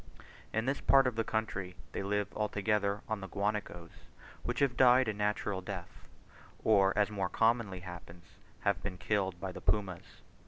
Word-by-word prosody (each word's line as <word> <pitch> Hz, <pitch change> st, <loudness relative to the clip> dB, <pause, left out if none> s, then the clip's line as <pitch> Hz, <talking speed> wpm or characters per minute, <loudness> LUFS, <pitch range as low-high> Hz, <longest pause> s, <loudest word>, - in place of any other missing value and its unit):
In 110 Hz, +1 st, 0 dB
this 135 Hz, +2 st, -1 dB
part 135 Hz, -1 st, +6 dB
of 125 Hz, -3 st, 0 dB
the 115 Hz, -, +1 dB
country 95 Hz, -5 st, -2 dB, 0.2 s
they -, -, -3 dB
live 100 Hz, 0 st, -1 dB
altogether 105 Hz, -1 st, 0 dB
on 110 Hz, -2 st, -2 dB
the 95 Hz, -, -5 dB
guanacos 100 Hz, -4 st, -3 dB, 0.5 s
which 120 Hz, -, -3 dB
have 135 Hz, -2 st, +2 dB
died 125 Hz, 0 st, +6 dB
a 110 Hz, -, 0 dB
natural 105 Hz, -1 st, -1 dB
death, 90 Hz, -2 st, -8 dB, 0.6 s
or 100 Hz, -3 st, +5 dB
as 105 Hz, 0 st, +3 dB
more 95 Hz, -3 st, -1 dB
commonly 110 Hz, -5 st, +1 dB
happens, 90 Hz, -1 st, -10 dB, 0.4 s
have 100 Hz, -4 st, +1 dB
been 95 Hz, -2 st, -5 dB
killed 95 Hz, -3 st, -1 dB
by 95 Hz, 0 st, -4 dB
the -, -, -9 dB
pumas. 95 Hz, -5 st, -2 dB
105 Hz, 165 wpm, -32 LUFS, 95-110 Hz, 0.6 s, part